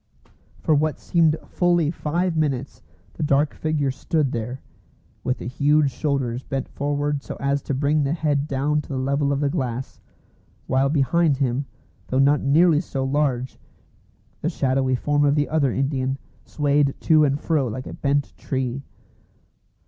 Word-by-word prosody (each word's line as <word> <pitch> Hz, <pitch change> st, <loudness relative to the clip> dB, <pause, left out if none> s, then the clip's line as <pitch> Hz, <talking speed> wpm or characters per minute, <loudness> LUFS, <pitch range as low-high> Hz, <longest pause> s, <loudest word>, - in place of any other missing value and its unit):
For 155 Hz, -, +2 dB
what 155 Hz, +1 st, +1 dB
seemed 160 Hz, -2 st, +2 dB
fully 175 Hz, -4 st, +1 dB
five 170 Hz, +2 st, -1 dB
minutes 140 Hz, -4 st, -1 dB, 0.3 s
the -, -, -8 dB
dark 145 Hz, 0 st, +2 dB
figure 150 Hz, -3 st, -1 dB
stood 140 Hz, +1 st, -1 dB
there, 120 Hz, +3 st, -4 dB, 0.6 s
with 125 Hz, -, 0 dB
the -, -, -8 dB
huge 145 Hz, +3 st, +2 dB
shoulders 130 Hz, -3 st, -1 dB
bent 135 Hz, -1 st, -4 dB
forward 145 Hz, 0 st, -1 dB
so -, -, -7 dB
as 140 Hz, 0 st, 0 dB
to 140 Hz, -, -3 dB
bring 145 Hz, +3 st, +2 dB
the 140 Hz, +1 st, 0 dB
head 150 Hz, -3 st, 0 dB
down 145 Hz, +2 st, 0 dB
to -, -, -16 dB
the 135 Hz, -, -3 dB
level 140 Hz, +2 st, 0 dB
of 140 Hz, 0 st, 0 dB
the 145 Hz, -, +2 dB
glass; 130 Hz, -5 st, -3 dB, 0.7 s
while 135 Hz, +1 st, +2 dB
behind 150 Hz, +1 st, +2 dB
him, 135 Hz, 0 st, -1 dB, 0.4 s
though 130 Hz, -, -1 dB
not 140 Hz, +2 st, +4 dB
nearly 155 Hz, +3 st, +4 dB
so 135 Hz, -6 st, -4 dB
large, 135 Hz, -2 st, -1 dB, 0.8 s
the 160 Hz, -, 0 dB
shadowy 130 Hz, -4 st, +1 dB
form 145 Hz, +3 st, +1 dB
of 145 Hz, 0 st, +3 dB
the 145 Hz, -1 st, +1 dB
other 145 Hz, -5 st, +1 dB
Indian 135 Hz, 0 st, -1 dB, 0.3 s
swayed 145 Hz, -1 st, +1 dB
to 155 Hz, -1 st, +5 dB
and 140 Hz, 0 st, +1 dB
fro 150 Hz, -5 st, 0 dB
like 125 Hz, +3 st, -5 dB
a -, -, -7 dB
bent 140 Hz, 0 st, -1 dB
tree. 130 Hz, 0 st, -3 dB
140 Hz, 160 wpm, -23 LUFS, 135-150 Hz, 0.8 s, to